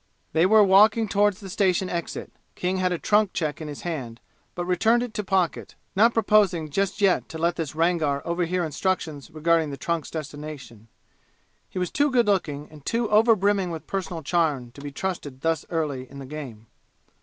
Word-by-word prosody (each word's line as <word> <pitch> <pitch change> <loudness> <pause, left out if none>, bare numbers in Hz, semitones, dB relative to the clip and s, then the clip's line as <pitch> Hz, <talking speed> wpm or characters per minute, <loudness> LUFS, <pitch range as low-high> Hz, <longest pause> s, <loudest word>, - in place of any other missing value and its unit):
They 165 +3 +4
were 215 +1 +6
walking 215 +3 +5
toward 205 0 +2
the 195 - -11
station 190 -1 +1
exit. 170 -2 -4 0.2
King 185 +1 -1
had 185 -1 +1
a 175 - 0
trunk 210 +2 +2
check 155 -2 -2
in 155 - -5
his 145 -1 -7
hand, 130 -9 -5 0.4
but 175 - -3
returned 220 +7 +2
it 245 -3 -6
to 210 -2 -3
pocket, 190 -3 -1 0.2
not 225 +5 +5
proposing 195 -8 +3
just 195 +4 -1
yet 195 -2 +2
to 160 - -6
let 170 +1 +1
this 155 -4 -4
Rangar 160 -4 +1
over 170 +1 0
hear 180 +1 -1
instructions 160 -3 -2
regarding 160 0 +1
the 140 - -6
trunk's 165 +2 -2
destination; 145 -7 -8 0.8
he - - -9
was 180 -1 -1
too 290 +1 +2
good 245 -3 +3
looking 155 -8 0
and 150 -2 -14
too 230 +6 0
overbrimming 205 -3 +3
with 160 -2 -6
personal 180 -4 -4
charm 145 -6 0
to 140 - -13
be 145 0 -6
trusted 145 -5 -5
thus 165 0 0
early 145 -6 -2
in 140 - -11
the 135 - -7
game. 130 -6 -8
170 Hz, 190 wpm, -25 LUFS, 150-195 Hz, 0.8 s, were